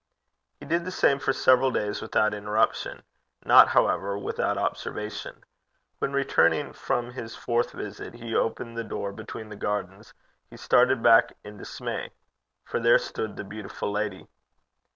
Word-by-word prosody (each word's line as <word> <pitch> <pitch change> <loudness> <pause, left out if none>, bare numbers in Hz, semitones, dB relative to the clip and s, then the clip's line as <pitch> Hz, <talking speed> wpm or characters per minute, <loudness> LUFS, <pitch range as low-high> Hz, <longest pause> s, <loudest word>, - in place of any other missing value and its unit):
He - - -10
did 170 +3 0
the 185 - -5
same 140 -6 +2
for 135 - +1
several 130 0 +4
days 105 -4 -2
without 110 -1 +1
interruption 105 +2 -1 0.4
not, - - +8
however, 100 +1 +1
without 100 - -2
observation. 105 0 -4 0.6
When, - - -1
returning 140 0 +2
from 120 0 -2
his 115 -2 -7
fourth 120 0 -1
visit, 105 +2 -7
he 115 -1 -7
opened 115 +1 -1
the 115 - -2
door 100 -2 -4
between 110 +1 -8
the 105 - -8
gardens, 105 0 -4 0.3
he - - -13
started 125 -1 +3
back 115 -1 +5
in 105 0 -10
dismay, - - -5 0.6
for - - -2
there 115 0 +6
stood 110 -2 -5
the - - -6
beautiful 105 0 -6
lady. 105 -2 -3
110 Hz, 150 wpm, -26 LUFS, 105-120 Hz, 0.6 s, not